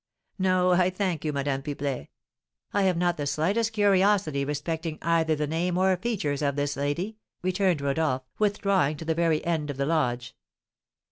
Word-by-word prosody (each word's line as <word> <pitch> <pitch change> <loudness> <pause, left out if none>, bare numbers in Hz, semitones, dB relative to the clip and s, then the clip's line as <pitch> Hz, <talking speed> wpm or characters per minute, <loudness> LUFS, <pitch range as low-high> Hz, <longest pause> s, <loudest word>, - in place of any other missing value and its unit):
"No, 185 -1 +3
I 180 0 +4
thank 185 -4 -2
you, 155 - 0
Madame 140 -1 -1
Pipelet; 140 - -4 0.7
I 200 - +2
have 185 -3 +2
not 175 0 +1
the 145 -1 -2
slightest 200 +11 +1
curiosity 195 -8 +3
respecting 155 +3 -3
either 165 -1 +2
the 150 0 -1
name 170 +4 -1
or 190 0 +3
features 180 -9 -2
of 140 -2 0
this 145 0 -1
lady," 145 +10 -2 0.3
returned 185 -3 +1
Rodolph, 140 -2 0 0.2
withdrawing 200 -7 +1
to 160 - -7
the 165 - +1
very 165 -1 +1
end 160 -3 -1
of 140 - -4
the 140 - 0
lodge. 125 -6 -1
165 Hz, 165 wpm, -27 LUFS, 145-185 Hz, 0.7 s, I